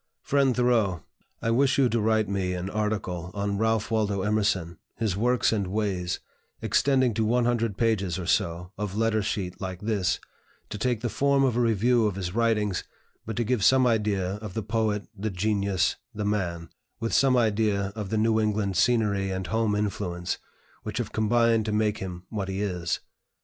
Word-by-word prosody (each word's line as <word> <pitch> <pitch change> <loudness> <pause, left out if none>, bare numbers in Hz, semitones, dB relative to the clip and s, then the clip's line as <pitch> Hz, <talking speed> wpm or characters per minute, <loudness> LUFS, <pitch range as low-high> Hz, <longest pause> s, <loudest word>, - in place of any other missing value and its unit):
"FRIEND 135 -3 +2
THOREAU, 115 -9 +2 0.4
I 115 - +1
wish 135 +3 +3
you 135 -2 +5
to 115 -1 0
write 110 0 +2
me 95 -2 -1
an 90 +2 -4
article 105 -5 -2
on 100 0 -1
Ralph 110 0 +1
Waldo 105 -3 0
Emerson, 100 -5 0 0.2
his 110 -5 -1
Works 120 +4 +2
and 100 -4 -1
Ways, 95 -3 -1 0.4
extending 130 -4 +2
to 110 - 0
one 120 +2 +2
hundred 115 -4 0
pages, 100 -6 +1
or 90 - -4
so, 85 +2 0
of 105 -1 -3
letter 110 -1 +2
sheet 95 -3 -3
like 95 -2 -4
this, 105 -4 0 0.5
to 105 - -6
take 120 -1 0
the 120 - -1
form 140 +5 +2
of 130 -4 +2
a - - +1
review 115 0 +3
of 100 - -2
his 90 -2 -4
writings, 105 -4 +1 0.4
but 110 - -3
to 120 - 0
give 115 -2 0
some 130 +5 +5
idea 105 -5 +1
of 105 -3 -8
the 110 - -2
Poet, 110 -2 -1
the 105 +2 -3
Genius, 100 -1 0 0.2
the 105 0 -2
Man, 85 -5 -2 0.3
with 115 0 -2
some 130 -2 +4
idea 105 -3 +1
of 105 -3 -5
the 110 - 0
New 110 +1 +3
England 105 -3 0
scenery 105 -3 +2
and 95 0 -3
home 110 +1 0
influence, 100 -4 -2 0.4
which - - -5
have - - -2
combined 115 +1 +2
to 110 - -1
make 105 0 +1
him 90 -2 -6
what 100 -3 -3
he 95 0 -3
is. 90 -4 -2
105 Hz, 185 wpm, -26 LUFS, 95-115 Hz, 0.5 s, you